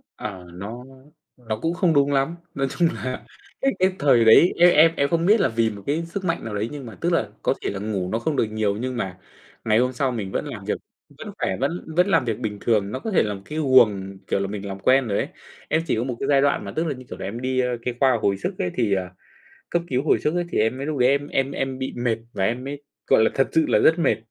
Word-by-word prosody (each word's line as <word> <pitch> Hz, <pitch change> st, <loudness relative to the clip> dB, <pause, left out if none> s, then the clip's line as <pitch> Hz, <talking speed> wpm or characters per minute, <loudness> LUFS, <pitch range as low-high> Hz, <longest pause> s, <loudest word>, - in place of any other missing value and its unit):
Ờ, 95 Hz, -4 st, -7 dB
nó 105 Hz, +7 st, -7 dB, 0.5 s
nó 110 Hz, -3 st, -4 dB
cũng 165 Hz, -, 0 dB
không 175 Hz, -2 st, +2 dB
đúng 140 Hz, 0 st, +3 dB
lắm. 135 Hz, +4 st, +1 dB, 0.2 s
Nói 135 Hz, -1 st, -1 dB
chung 170 Hz, +4 st, +2 dB
là, 125 Hz, +4 st, -5 dB, 0.4 s
cái 270 Hz, -, +3 dB
cái, 185 Hz, 0 st, +3 dB
thời 125 Hz, -5 st, +4 dB
đấy 110 Hz, +10 st, +7 dB
em 175 Hz, +1 st, +7 dB
em 160 Hz, +1 st, +6 dB
em 140 Hz, -, +2 dB
không 170 Hz, 0 st, +1 dB
biết 215 Hz, +4 st, +5 dB
là 130 Hz, -, +3 dB
vì 115 Hz, 0 st, +1 dB
một 100 Hz, -2 st, -9 dB
cái 155 Hz, +4 st, 0 dB
sức 185 Hz, +3 st, -5 dB
mạnh 165 Hz, -1 st, -1 dB
nào 110 Hz, -2 st, -4 dB
đấy 105 Hz, +3 st, -2 dB
nhưng 145 Hz, -3 st, -7 dB
mà 115 Hz, -4 st, -9 dB
tức -, -, +1 dB
là -, -, +1 dB
có -, -, +2 dB
thể -, -, -2 dB
là 100 Hz, -, -4 dB
ngủ 100 Hz, -3 st, -3 dB
nó 115 Hz, -, 0 dB
không 150 Hz, +5 st, -1 dB
được -, -, +2 dB
nhiều, 105 Hz, -2 st, -1 dB
nhưng 130 Hz, +1 st, -3 dB
mà 95 Hz, -5 st, -4 dB, 0.5 s
ngày 110 Hz, 0 st, +3 dB
hôm 125 Hz, +1 st, +1 dB
sau 130 Hz, +1 st, 0 dB
mình 105 Hz, -6 st, -4 dB
vẫn -, -, -2 dB
làm -, -, -7 dB
việc, -, -, -1 dB, 0.4 s
vẫn -, -, -8 dB
khỏe, 95 Hz, -, -1 dB
vẫn 165 Hz, +6 st, -2 dB
vẫn 180 Hz, +2 st, +4 dB
làm 165 Hz, -9 st, +3 dB
việc 115 Hz, -2 st, -2 dB
bình 110 Hz, -4 st, -3 dB
thường. 105 Hz, -4 st, +1 dB
Nó 130 Hz, -, -3 dB
có 220 Hz, -, -4 dB
thể 190 Hz, -, +4 dB
là 105 Hz, -, -2 dB
một 100 Hz, -, -8 dB
cái 155 Hz, +1 st, -4 dB
guồng, 105 Hz, -9 st, +3 dB
kiểu -, -, 0 dB
là, 100 Hz, -, -1 dB
mình 100 Hz, 0 st, -6 dB
làm 95 Hz, 0 st, -6 dB
quen 130 Hz, +3 st, +3 dB
rồi 100 Hz, -2 st, 0 dB
ấy. -, -, -1 dB, 0.4 s
Em 160 Hz, -, +2 dB
chỉ -, -, +1 dB
có 110 Hz, -, -1 dB
một 125 Hz, -1 st, -3 dB
cái -, -, -2 dB
giai 140 Hz, -1 st, +5 dB
đoạn 145 Hz, 0 st, +1 dB
mà -, -, -5 dB
tức 160 Hz, -, 0 dB
là, 145 Hz, -, -1 dB
như 130 Hz, 0 st, -12 dB
kiểu -, -, -8 dB
là, -, -, -5 dB
em 115 Hz, +5 st, -5 dB
đi, 130 Hz, 0 st, 0 dB
ơ, 125 Hz, -, +2 dB
cái, 125 Hz, 0 st, -2 dB
khoa 130 Hz, -3 st, +4 dB
hồi 100 Hz, -2 st, +1 dB
sức -, -, -3 dB
ấy 90 Hz, -, -1 dB
thì, 110 Hz, -5 st, +1 dB
ờ 95 Hz, -1 st, -1 dB, 0.6 s
cấp 175 Hz, -, +1 dB
cứu 130 Hz, 0 st, 0 dB
hồi -, -, +3 dB
sức 150 Hz, -, -1 dB
ấy, 175 Hz, 0 st, 0 dB
thì -, -, -1 dB
em 110 Hz, +3 st, +2 dB
mới 135 Hz, +2 st, -5 dB
lúc 155 Hz, -2 st, -2 dB
đấy 125 Hz, 0 st, +4 dB
em 140 Hz, +1 st, +1 dB
em 135 Hz, -1 st, 0 dB
em 135 Hz, -1 st, -3 dB
bị 130 Hz, 0 st, -4 dB
mệt, 120 Hz, -2 st, 0 dB, 0.2 s
và 95 Hz, -, -1 dB
em 120 Hz, +5 st, -1 dB
mới, 140 Hz, +1 st, -6 dB, 0.2 s
gọi 135 Hz, -5 st, +5 dB
là, -, -, +3 dB
thật 135 Hz, -, +2 dB
sự 160 Hz, -, +3 dB
là -, -, +4 dB
rất 160 Hz, +2 st, +4 dB
mệt. 165 Hz, -, +2 dB
125 Hz, 290 wpm, -23 LUFS, 110-145 Hz, 0.6 s, đấy